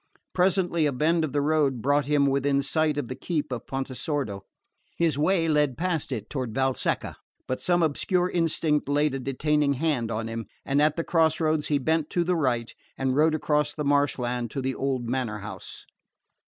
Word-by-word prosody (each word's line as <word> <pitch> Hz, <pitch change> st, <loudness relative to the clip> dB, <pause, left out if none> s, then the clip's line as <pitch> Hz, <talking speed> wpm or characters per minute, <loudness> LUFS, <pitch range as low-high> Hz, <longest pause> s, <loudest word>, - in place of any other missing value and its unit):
Presently 180 Hz, -3 st, +2 dB
a -, -, 0 dB
bend 160 Hz, +5 st, +1 dB
of 155 Hz, -, -2 dB
the 145 Hz, +1 st, +1 dB
road 145 Hz, -4 st, +2 dB
brought 145 Hz, +3 st, +1 dB
him 145 Hz, -1 st, +3 dB
within 140 Hz, 0 st, +1 dB
sight 155 Hz, 0 st, +1 dB
of 145 Hz, -, -2 dB
the 130 Hz, -, -4 dB
keep 150 Hz, +1 st, -3 dB
of 120 Hz, -3 st, -5 dB
Pontesordo. 135 Hz, -4 st, -3 dB, 0.6 s
His 165 Hz, -4 st, +2 dB
way 165 Hz, +3 st, +2 dB
led 150 Hz, -4 st, +2 dB
past 165 Hz, -5 st, -1 dB
it, 110 Hz, -5 st, -4 dB
toward 125 Hz, -6 st, -4 dB
Valsecca; 135 Hz, -1 st, -1 dB, 0.3 s
but 130 Hz, -, -3 dB
some 175 Hz, -1 st, +2 dB
obscure 175 Hz, +4 st, +1 dB
instinct 160 Hz, -4 st, 0 dB
laid 145 Hz, 0 st, +2 dB
a 135 Hz, -, -2 dB
detaining 140 Hz, +2 st, +1 dB
hand 140 Hz, -5 st, 0 dB
on 115 Hz, 0 st, -3 dB
him, 115 Hz, -2 st, -5 dB, 0.2 s
and 140 Hz, +1 st, +2 dB
at 150 Hz, 0 st, +3 dB
the 165 Hz, -, -1 dB
cross 160 Hz, -2 st, +2 dB
roads 155 Hz, -2 st, +1 dB
he 145 Hz, -, +2 dB
bent 160 Hz, +2 st, 0 dB
to 175 Hz, -, +1 dB
the 180 Hz, +1 st, +1 dB
right 125 Hz, -7 st, 0 dB, 0.2 s
and 130 Hz, -1 st, 0 dB
rode 155 Hz, +2 st, +4 dB
across 150 Hz, -1 st, 0 dB
the 150 Hz, -, -3 dB
marshland 125 Hz, -4 st, +1 dB
to 135 Hz, -, -4 dB
the 130 Hz, 0 st, -1 dB
old 130 Hz, -3 st, -2 dB
manor 120 Hz, -4 st, -2 dB
house. 105 Hz, -1 st, -8 dB
145 Hz, 190 wpm, -26 LUFS, 130-155 Hz, 0.6 s, rode